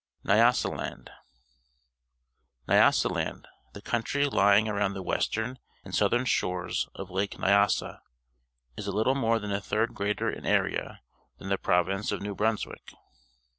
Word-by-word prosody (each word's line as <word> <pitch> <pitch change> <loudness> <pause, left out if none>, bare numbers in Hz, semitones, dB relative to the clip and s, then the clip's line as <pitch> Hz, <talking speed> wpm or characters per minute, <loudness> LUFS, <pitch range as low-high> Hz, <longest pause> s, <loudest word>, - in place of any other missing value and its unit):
NYASALAND 115 +5 +1 1.6
N'ljasaland, - - +2 0.3
the 100 - -11
country 130 +5 0
lying 100 -5 +4
around 100 -2 -1
the 95 - -5
western 120 +7 -2 0.3
and - - -10
southern 120 +1 +2
shores 90 -6 -1
of - - -8
Lake 95 +2 -2
Xyasa, 100 +1 +2 0.8
is - - -6
a - - -1
Uttle 110 +5 +2
more 115 -4 +2
than 105 -2 -5
a 100 0 -1
third 110 +4 -1
greater 100 +1 -1
in - - -8
area - - -1 0.3
than 95 - -8
the 100 - 0
province 95 +3 +1
of 105 - -2
New 100 0 -4
Brunswick. 110 +2 -2
105 Hz, 135 wpm, -28 LUFS, 100-115 Hz, 1.6 s, lying